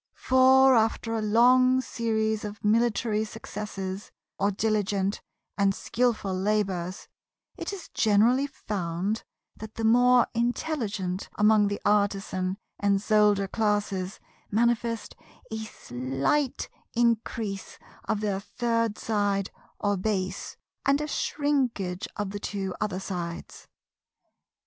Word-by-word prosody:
For, 260 +1 +5
after 225 0 +1
a 225 - -1
long 250 +4 +5
series 220 -3 -1
of 210 0 -7
military 220 0 +2
successes, 205 -3 -6 0.3
or 200 - +3
diligent 205 -1 0 0.4
and 195 -1 +3
skillful 235 -5 0
labours, 190 -2 -1 0.5
it - - -5
is 390 -3 -7
generally 230 +6 +3
found 195 -2 -3 0.3
that 220 0 -9
the 225 - -4
more 245 +2 +5
intelligent 230 - -2
among 210 0 +4
the 205 0 -2
Artisan 195 -2 +1 0.2
and 200 -1 +2
Soldier 210 -1 +3
classes 205 -3 -1 0.3
manifest 230 +1 0 0.4
a 220 - -3
slight 135 - -1 0.3
increase 230 -3 -1 0.3
of 210 - -1
their 200 -2 -1
third 230 0 -1
side 205 -3 0 0.3
or 205 -1 +1
base, 190 -1 -2 0.3
and 280 +1 +3
a 300 - -2
shrinkage 260 - -1
of 205 -2 -3
the 205 - -5
two 195 -2 -3
other 200 -4 -1
sides. 175 -3 -6
210 Hz, 110 wpm, -27 LUFS, 195-230 Hz, 0.5 s, For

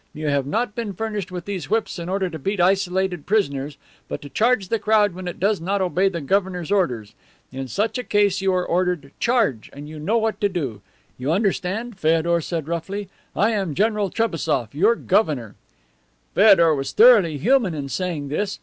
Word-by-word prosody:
You 155 0 -2
have 140 -1 0
not 220 +7 -1
been 220 -3 -4
furnished 210 -1 -4
with 180 -1 -6
these 200 -3 -5
whips 220 -3 -1
in 170 +1 -5
order 190 0 0
to 165 -3 -7
beat 195 +7 -2
isolated 185 -2 +1
prisoners, 145 -9 0 0.3
but - - -5
to 145 - -9
charge 220 - +1
the 230 - 0
crowd 210 -2 +3
when 185 0 -7
it 175 - -6
does 200 -1 +1
not 195 +4 -1
obey 190 +1 +2
the 170 -3 -5
governor's 185 +2 -1
orders. 125 - 0 0.4
In 135 0 -5
such 215 - -1
a - - -3
case 205 -2 +2
you 195 0 +2
are 180 -1 0
ordered 175 -5 -1
"Charge," 225 - +1
and 145 +1 -10
you 155 0 -9
know 205 +10 +1
what 220 -1 -1
to 205 - +2
do. 135 - -4 0.4
You 130 +4 -1
understand?' 200 +3 -1
Feodor 165 +1 +2
said 160 -2 -4
roughly. 190 +4 -4 0.3
'I 210 +3 +2
am 195 -9 -2
General 210 -1 +1
Trebassof, 165 - -1
your 205 +11 +3
governor.' 155 - 0 0.8
"Feodor 190 -6 +6
was 135 -2 -3
thoroughly 210 -10 +6
human 220 - +2
in 140 -2 -4
saying 160 -2 -3
this. 195 +7 -2
185 Hz, 190 wpm, -22 LUFS, 155-205 Hz, 0.8 s, Feodor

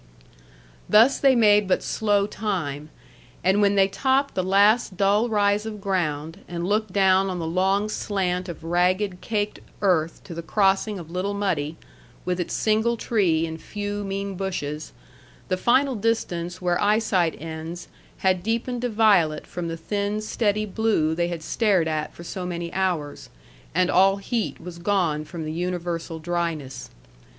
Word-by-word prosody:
Thus 230 +6 +6
they 270 -2 +5
made 210 -3 +5
but 185 - +1
slow 205 -2 +1
time, 170 -9 -3 0.5
and 190 +3 +3
when 200 0 +3
they 195 -1 +5
topped 270 +7 +1
the 185 - 0
last 200 +2 +3
dull 205 +4 +3
rise 205 -1 +2
of 220 -1 -6
ground 165 -5 -2
and 170 0 -4
looked 210 +1 0
down 190 0 +3
on 185 - -3
the 165 - -3
long 190 +5 +1
slant 185 -4 -2
of 170 -1 -8
ragged, 180 +3 +1
caked 210 -1 -2 0.2
earth 165 -4 +1
to 175 - -9
the 170 - -5
crossing 195 +3 +1
of 165 -2 -9
Little 190 +3 -2
Muddy, 165 -7 -1 0.5
with 180 0 -1
its 175 - -3
single 220 +2 +1
tree 180 -9 +1
and 160 0 -7
few 205 0 -4
mean 195 0 -3
bushes, 155 -6 -4 0.6
the - - +2
final 260 +8 +2
distance 185 -6 -2
where 175 -1 0
eyesight 205 -6 +2
ends 165 +2 -7 0.3
had 185 -1 +1
deepened 235 +4 -2
to 245 - -1
violet 205 -9 +3
from 175 -1 -5
the 165 0 -4
thin, 205 +5 -2
steady 215 -1 0
blue 210 -6 +1
they 170 +1 0
had 170 -2 -5
stared 195 -4 +2
at 155 -1 -2
for 170 - -12
so 180 +2 -5
many 170 -1 -4
hours, 175 -7 -2 0.5
and 180 0 +3
all 195 +1 +5
heat 225 +3 -3
was 170 0 -9
gone 170 -5 +1
from 165 -1 -6
the 155 - -4
universal 175 -1 -3
dryness. 160 -5 -3
190 Hz, 160 wpm, -24 LUFS, 170-210 Hz, 0.6 s, Thus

